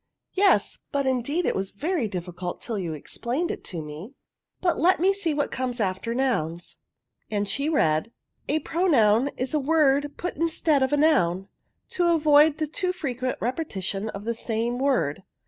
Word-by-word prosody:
*' -, -, -60 dB
" -, -, -58 dB
Yes, 390 Hz, +1 st, +3 dB
but, 280 Hz, -2 st, 0 dB
indeed, 265 Hz, +6 st, 0 dB
it -, -, +1 dB
was 190 Hz, 0 st, -2 dB
very 295 Hz, -, -1 dB
difficult 180 Hz, -1 st, -5 dB
till 225 Hz, -4 st, -4 dB
you 170 Hz, -4 st, -3 dB
explained 245 Hz, -, -3 dB
it -, -, -7 dB
to 165 Hz, -4 st, -5 dB
me; 155 Hz, -, -9 dB, 0.4 s
but 350 Hz, -2 st, +1 dB
let 365 Hz, +2 st, +4 dB
me 380 Hz, +3 st, +4 dB
see 390 Hz, -5 st, -1 dB
what 290 Hz, -1 st, -1 dB
comes 255 Hz, -1 st, -3 dB
after 200 Hz, +3 st, -1 dB
nouns," 175 Hz, -11 st, -2 dB, 0.5 s
and 205 Hz, -1 st, -1 dB
she 280 Hz, +9 st, -1 dB
read, 160 Hz, -, +1 dB
" -, -, -55 dB
' -, -, -23 dB
a 310 Hz, +2 st, +1 dB
pronoun 275 Hz, -, +3 dB
is 255 Hz, +2 st, -2 dB
a 305 Hz, -, +2 dB
word 290 Hz, -1 st, +2 dB
put 355 Hz, -, -4 dB
instead 320 Hz, -2 st, +1 dB
of 265 Hz, -, +1 dB
a 295 Hz, -, +3 dB
noun, 195 Hz, -, +2 dB, 0.4 s
to 350 Hz, -1 st, +2 dB
avoid 300 Hz, -1 st, +5 dB
the 310 Hz, -, 0 dB
too 360 Hz, +5 st, -2 dB
frequent 255 Hz, -8 st, -3 dB
repetition 220 Hz, -, -2 dB
of 205 Hz, 0 st, -7 dB
the 235 Hz, -, 0 dB
same 230 Hz, +2 st, -2 dB
word.' 250 Hz, -, +1 dB
260 Hz, 185 wpm, -25 LUFS, 200-310 Hz, 0.5 s, avoid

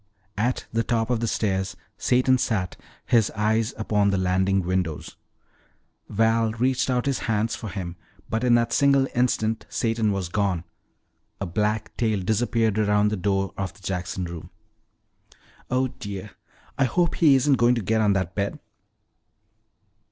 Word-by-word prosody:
At 120 Hz, +4 st, 0 dB
the 115 Hz, -, +2 dB
top 115 Hz, 0 st, 0 dB
of 120 Hz, -, +1 dB
the 115 Hz, -, -1 dB
stairs 95 Hz, -3 st, -1 dB, 0.2 s
Satan 130 Hz, +1 st, +2 dB
sat, 95 Hz, -7 st, -1 dB, 0.3 s
his 115 Hz, -3 st, +3 dB
eyes 110 Hz, +1 st, +1 dB
upon 105 Hz, -2 st, +1 dB
the 100 Hz, -, +1 dB
landing 95 Hz, +1 st, +2 dB
windows. 90 Hz, -4 st, -2 dB, 0.9 s
Val 115 Hz, +1 st, +2 dB
reached 125 Hz, +3 st, +1 dB
out 125 Hz, -1 st, +1 dB
his 140 Hz, -2 st, 0 dB
hands 110 Hz, +1 st, +1 dB
for 110 Hz, -, -6 dB
him, 90 Hz, -2 st, -6 dB, 0.3 s
but 110 Hz, +2 st, -2 dB
in 120 Hz, -1 st, +5 dB
that 120 Hz, 0 st, +1 dB
single 140 Hz, -1 st, +4 dB
instant 115 Hz, -3 st, 0 dB
Satan 115 Hz, -2 st, 0 dB
was 95 Hz, -3 st, -2 dB
gone. 95 Hz, -2 st, 0 dB, 0.8 s
A 100 Hz, -, -2 dB
black 105 Hz, +4 st, -1 dB
tail 110 Hz, -4 st, +1 dB
disappeared 110 Hz, +2 st, +1 dB
around 105 Hz, 0 st, +3 dB
the 105 Hz, -, -1 dB
door 95 Hz, 0 st, -1 dB
of 95 Hz, -1 st, -4 dB
the -, -, -19 dB
Jackson 90 Hz, 0 st, -3 dB
room. 85 Hz, -1 st, -8 dB, 1.2 s
"Oh, 130 Hz, +1 st, +1 dB
dear, 105 Hz, -6 st, -7 dB, 0.5 s
I 135 Hz, -, +4 dB
hope 170 Hz, +7 st, +1 dB
he 150 Hz, -5 st, +5 dB
isn't 135 Hz, +1 st, +3 dB
going 120 Hz, +1 st, +4 dB
to 115 Hz, -, -2 dB
get 110 Hz, +3 st, +1 dB
on 105 Hz, -2 st, +3 dB
that 95 Hz, -2 st, -1 dB
bed." 100 Hz, 0 st, -2 dB
110 Hz, 155 wpm, -24 LUFS, 95-120 Hz, 1.2 s, in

